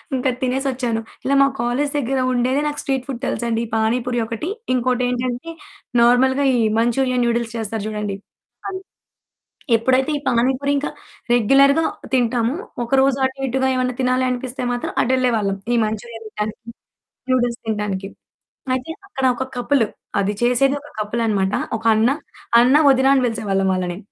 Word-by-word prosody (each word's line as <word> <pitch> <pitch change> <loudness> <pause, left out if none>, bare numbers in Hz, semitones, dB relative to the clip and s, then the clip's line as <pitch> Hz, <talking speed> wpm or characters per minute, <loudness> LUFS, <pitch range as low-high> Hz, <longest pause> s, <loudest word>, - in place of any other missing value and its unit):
ఇంకా 260 +1 0
తినేసొచ్చాను. 255 -3 -1 0.2
ఇలా 280 +1 +2
మా 275 - +6
కాలేజీ 265 +4 0
దెగ్గర 270 -1 0
ఉండేదే 255 +3 +1
నాకు 295 - -3
స్ట్రీట్ 265 -2 -1
ఫుడ్ 250 -3 -5
తెలుసండి 235 -1 -1
పాని 220 +2 +2
పూరి 245 -1 -1
ఒకటి 230 - -4 0.2
ఇంకోటేంటంటే 250 +3 -1 0.5
నార్మల్‌గా 260 +3 +4
ఈ - - +1 0.2
మంచూరియన్ 250 +1 +1
నూడిల్స్ 235 -1 -1
చేస్తారు 220 -1 -3
జూడండి. 210 -2 -3 0.5
అది 380 -1 -4 1.0
ఎప్పుడైతే 260 +5 +2
ఈ - - -5
పాని 245 +2 +2
పూరి 280 0 0
ఇంకా 285 - -2 0.4
రెగ్యులర్‌గా 275 +6 +5 0.3
తింటాము 245 +1 +1 0.3
ఒకరోజు 270 +2 +3
అటు 265 +1 -4
ఇటుగా 265 +1 0
ఏమన్నా 255 -1 -1
తినాలనిపిస్తే 255 0 -1
మాత్రం 245 - -4
అటెళ్ళేవాళ్ళం, 235 -6 +1 0.2
ఈ - - +3
మంచురియా 225 +2 -5
తింటానికి 215 +2 -5 0.6
నూడిల్స్ 245 -2 +1
తింటానికి. 205 -3 -2 0.7
అయితే 260 +5 -3 0.2
అక్కడ 270 -9 -3
ఒక 260 - -2
కపులు 245 -1 +2 0.3
అది 200 +1 0
చేసేది 250 +3 +3
ఒక 295 - -14
కపులనమాట. 210 -3 0 0.2
ఒక 225 - -14
అన్న. 225 +3 +3 0.5
అన్న 250 +3 +5
వదిన 265 0 +4
అని 265 -2 +3
పిలిసేవాళ్ళం 195 -4 -1
వాళ్ళని. 180 -1 -2
245 Hz, 140 wpm, -20 LUFS, 225-265 Hz, 1.0 s, మా